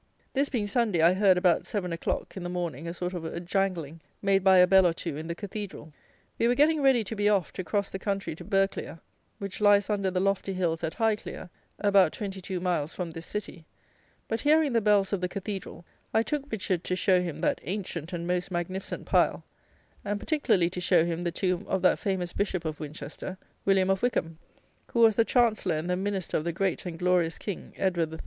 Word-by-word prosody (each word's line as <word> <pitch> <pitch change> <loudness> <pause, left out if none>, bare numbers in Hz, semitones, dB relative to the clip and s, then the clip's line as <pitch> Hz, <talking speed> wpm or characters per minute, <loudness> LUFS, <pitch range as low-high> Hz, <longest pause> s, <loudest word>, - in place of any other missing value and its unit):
This 280 +1 +1
being 230 -6 -1
Sunday, 210 -4 +1
I 170 +2 +6
heard, 190 -1 +4
about 180 -2 +3
7 185 -6 -2
o'clock 165 - -3
in 190 - -5
the 175 - -4
morning, 170 -4 -4
a 170 - -3
sort 180 +1 -3
of 175 -2 -4
a 160 +1 -4
jangling, 175 -4 -2 0.2
made 195 -1 +2
by 190 -1 +6
a 180 - +8
bell 190 0 +6
or 170 - +1
two 165 -2 -5
in 155 +2 -6
the 170 - -3
Cathedral. 200 -5 -7 0.5
We 230 - +3
were 245 - +3
getting 300 +2 +4
ready 265 -4 +4
to 220 +2 -6
be 205 0 +2
off, 195 -6 +1
to 185 - -4
cross 200 +4 -1
the 190 - -4
country 195 -3 -2
to 155 - -10
Burghclere, 195 -4 -1 0.4
which 200 -1 -6
lies 205 0 +5
under 200 -2 +1
the 185 0 -1
lofty 195 0 0
hills 170 -3 -1
at 160 - -2
Highclere, 220 -5 -2 0.3
about 200 -5 +4
22 190 -2 -5
miles 175 -3 -1
from 175 -3 -4
this 165 0 -8
city; 205 -5 -6 0.6
but 225 0 -2
hearing 300 -2 +3
the 230 - +3
bells 205 -2 +3
of 195 - 0
the 180 - -1
cathedral, 195 -3 -6 0.3
I 220 - +4
took 285 +2 -3
Richard 185 -5 -1
to 180 - 0
show 185 -1 +3
him 170 -4 -4
that - - +1
ancient 180 -4 -4
and 170 -1 -4
most 180 +1 -1
magnificent 185 +2 -4
pile, - - +2 0.6
and 205 0 -2
particularly 200 - +1
to 180 - -4
show 175 -2 +4
him 170 0 -2
the 170 - -1
tomb 180 +1 -1
of 190 -1 -1
that 185 - +4
famous 185 -3 -2
bishop 190 -4 -1
of 155 -1 -3
Winchester, 155 +4 -7 0.3
William 195 -1 +3
of 195 - 0
Wykham; 165 -10 -1 0.5
who 235 - +2
was 225 -2 +6
the 230 - +4
Chancellor 220 -9 +2
and 155 +3 -3
the 180 - +1
Minister 190 -1 -2
of 155 - -2
the 170 - -1
great 190 +1 -1
and 165 -2 -5
glorious 180 -2 +1
King, 200 -4 -6
Edward 175 -4 0
III. 160 - -7
185 Hz, 215 wpm, -28 LUFS, 175-205 Hz, 0.6 s, a